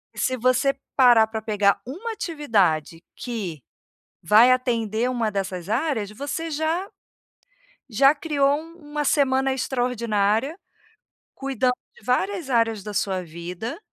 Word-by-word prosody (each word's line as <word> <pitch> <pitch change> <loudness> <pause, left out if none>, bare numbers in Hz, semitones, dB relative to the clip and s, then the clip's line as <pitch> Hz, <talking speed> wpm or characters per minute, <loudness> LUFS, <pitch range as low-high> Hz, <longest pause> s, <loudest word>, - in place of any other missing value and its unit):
se 255 0 -1
você 255 +3 +2 0.2
parar 240 -4 +6
para 220 0 -5
pegar 205 -2 +1
uma 400 - -5
atividade 200 - 0
que 195 - -5 0.6
vai 215 +8 +6
atender 235 -2 0
uma 230 -3 -1
dessas 190 -2 -4
áreas, 225 -3 -1
você 290 +8 -4
já 320 +5 -1 1.0
já 275 +6 +4
criou 285 -2 +1
um 330 +2 -10 0.2
uma 295 -1 -1
semana 270 -2 +2
extraordinária, 245 - 0 0.8
cuidando 260 -2 0 0.2
de - - -19
várias 330 +4 -1
áreas 225 -4 +1
da 210 0 -7
sua 190 -2 -1
vida, 170 +6 -6
245 Hz, 120 wpm, -23 LUFS, 210-280 Hz, 1.0 s, parar